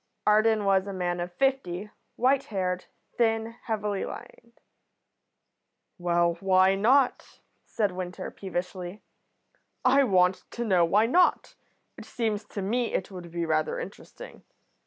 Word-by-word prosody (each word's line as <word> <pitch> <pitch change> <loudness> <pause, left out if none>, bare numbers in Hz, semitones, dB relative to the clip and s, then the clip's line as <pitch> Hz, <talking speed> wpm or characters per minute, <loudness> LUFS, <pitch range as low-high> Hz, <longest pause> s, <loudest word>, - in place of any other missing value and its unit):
Arden 215 0 +3
was 195 0 +2
a 200 - -4
man 175 -1 -2
of 175 +1 -4
fifty, 210 -5 -1 0.2
white 265 +2 +2
haired, 185 -3 -2 0.3
thin, 225 -1 +1
heavily 210 -3 -2
lined. 235 0 -10 1.4
"Well, 170 -1 +1
why 190 0 +4
not?" 245 +7 +2 0.3
said 205 -3 0
Winter, 180 0 -6
peevishly. 185 0 -5 0.8
"I 275 +2 +5
want 185 -5 +2
to 235 - -3
know 185 -5 +3
why 205 +6 +3
not. 350 +10 +2 0.5
It - - -10
seems 215 -3 -2
to 200 - -6
me 235 +4 -1
it 190 - -2
would 180 -2 -9
be 170 0 -3
rather 155 -1 0
interesting. - - -10
195 Hz, 130 wpm, -27 LUFS, 180-225 Hz, 1.4 s, I